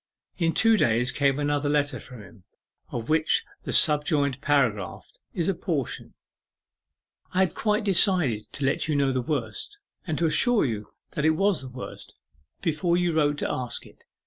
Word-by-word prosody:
In 165 -2 +1
two 225 0 +4
days 120 - +2
came 140 +1 +1
another 145 0 0
letter 145 -2 0
from 125 -5 -12
him, 100 -1 -17 0.5
of 115 -1 -5
which 155 0 +2 0.2
the - - -3
subjoined 145 -2 +3
paragraph 125 -10 0 0.3
is 170 - -1
a 195 - +2
portion: 160 -7 -4 1.2
'I - - +2
had 185 -4 +1
quite 210 0 0
decided 180 - +3
to 140 - -1
let 135 +3 0
you 155 - 0
know 140 -1 +2
the 130 -1 -1
worst, 125 - -4 0.3
and 155 -2 -2
to 170 - +1
assure 230 - +3
you 105 -5 -3 0.2
that 150 - -3
it 160 0 +3
was 195 -3 +2
the 130 - -8
worst, 125 0 -10 0.5
before 170 +2 +1
you 175 -1 +1
wrote 145 -2 +1
to - - -2
ask 125 -2 -3
it. - - -19
145 Hz, 170 wpm, -25 LUFS, 130-170 Hz, 1.2 s, two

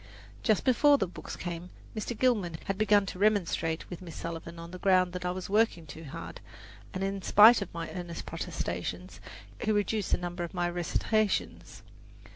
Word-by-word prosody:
Just 215 -3 +2
before 285 +3 +5
the 195 - +1
books 180 - -8
came, 175 0 -5 0.3
Mr. 220 +2 -4
Gilman 210 -10 +1
had 195 - -1
begun 205 0 +4
to 185 - -7
remonstrate 180 -6 +1
with 175 - -8
Miss 170 -3 -9
Sullivan 170 0 -6
on 170 0 -9
the 180 - -8
ground 185 -2 +3
that 180 0 -5
I - - +1
was 180 0 -4
working 210 -5 +2
too 160 +2 -10
hard, 135 - -8 0.5
and 190 - -3
in 195 0 -2
spite 215 +4 +7
of 200 - -5
my 165 -1 -5
earnest 175 -2 -6
protestations, 90 +1 -4 0.4
he 215 - +1
reduced 205 -1 0
the - - +4
number 175 0 -4
of 170 - -6
my 175 0 +1
recitations. 200 +4 -1
180 Hz, 180 wpm, -30 LUFS, 170-210 Hz, 0.5 s, spite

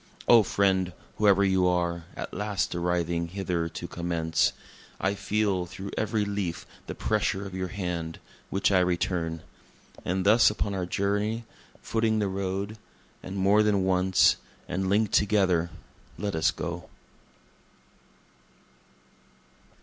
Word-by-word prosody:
(O 115 -1 +8
friend, 95 -3 +1 0.2
whoe'er 100 -2 +5
you 95 -2 +3
are, 85 -1 0
at - - -6
last 105 -1 -1
arriving 85 -1 0
hither 90 -2 -2
to 85 +1 -6
commence, 85 -2 0 0.5
I 95 +1 +1
feel 100 -3 0
through 95 +2 -7
every 110 -1 0
leaf 100 -4 -3 0.2
the - - -5
pressure 105 -2 0
of 95 - -8
your 95 0 -2
hand, 85 -4 -4 0.3
which 95 +1 +1
I 95 - +5
return. 85 -2 -1 0.6
And 95 +1 -1
thus 110 +4 +6
upon 105 -1 -2
our 90 -2 -2
journey, 105 +5 -1 0.4
footing 110 -1 +1
the 105 -2 +1
road, 100 +2 -3 0.4
and 95 - -7
more 100 +2 +4
than 105 -3 +2
once, 95 0 +4 0.3
and 95 +1 -1
link'd 105 +1 +2
together 95 -5 +3 0.5
let 100 +3 -2
us 80 0 +3
go.) - - -5
95 Hz, 125 wpm, -27 LUFS, 90-100 Hz, 0.6 s, O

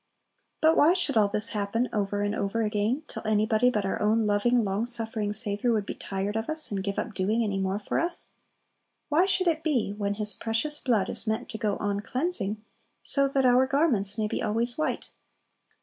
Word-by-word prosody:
But 320 +1 +4
why 315 +4 +5
should 350 -7 +3
all 215 -2 +4
this 210 +2 -2
happen 215 +3 -2
over 205 -1 -1
and 205 0 -1
over 215 +2 -2
again, 215 +7 -1
till - - -7
anybody 215 +2 +2
but 210 -5 -2
our 195 - -3
own 215 +1 +2
loving, 225 +4 +2
long 200 +2 -1
suffering 225 -3 -1
Saviour 210 +2 +1
would 215 -3 0
be - - -5
tired 195 +2 -4
of 220 +4 -3
us, 315 -4 +1
and 195 -1 -2
give 200 0 -4
up 225 - -4
doing 210 +5 0
any 200 -3 -2
more 190 +1 -1
for 205 - -3
us? 345 +1 -3 0.8
Why 330 +5 +3
should 375 -1 +1
it 320 -2 +1
be, 250 -10 0
when 205 -1 -2
His 210 -1 +8
precious 230 +9 0
blood 225 -7 0
is - - 0
meant 220 +3 -2
to 220 - -6
"go 210 -3 -1
on 205 -1 -2
cleansing," 215 - 0 0.4
so 275 -1 +3
that 270 -1 0
our 255 +1 +4
garments 250 -9 +2
may 215 -1 -1
be - - -3
always 230 +2 0
white? 310 - -3
220 Hz, 205 wpm, -26 LUFS, 205-250 Hz, 0.8 s, His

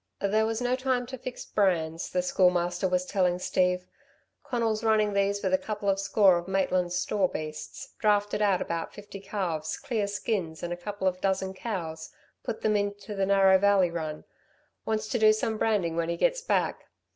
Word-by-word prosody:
"There 215 +2 +2
was 225 +1 -2
no 245 +1 +1
time 255 -1 0
to 260 +2 -7
fix 255 0 -7
brands," 165 -5 0
the 180 0 0
Schoolmaster 180 0 +2
was 180 0 0
telling 180 -2 +1
Steve. 180 0 0 0.6
"Conal's 230 -3 -1
running 215 -2 +3
these 200 0 +1
with 190 -1 0
a 185 - +4
couple 210 -1 -5
of 195 - -1
score 195 -2 +4
of 175 - -9
Maitland's 185 -2 0
store 190 0 +1
beasts. 155 -1 -7
Drafted 205 -1 +2
out 200 -3 +2
about 165 -1 -4
fifty 205 -1 -9
calves, 175 -6 -3
clear 230 -7 -2
skins 195 -5 -3
and 175 0 -2
a - - -3
couple 190 +2 -4
of 185 0 -1
dozen 190 -1 0
cows, 170 -7 -5 0.3
put 220 - -4
them 215 -1 +2
into 205 +1 -2
the 195 -1 0
Narrow 195 -1 +5
Valley 195 -3 +4
run 155 -2 -4 0.6
wants 220 -1 -1
to 240 - 0
do 215 0 +7
some 215 0 -1
branding 195 -7 +1
when 170 0 -1
he 170 - -1
gets - - +1
back. - - -1
195 Hz, 185 wpm, -28 LUFS, 180-215 Hz, 0.6 s, do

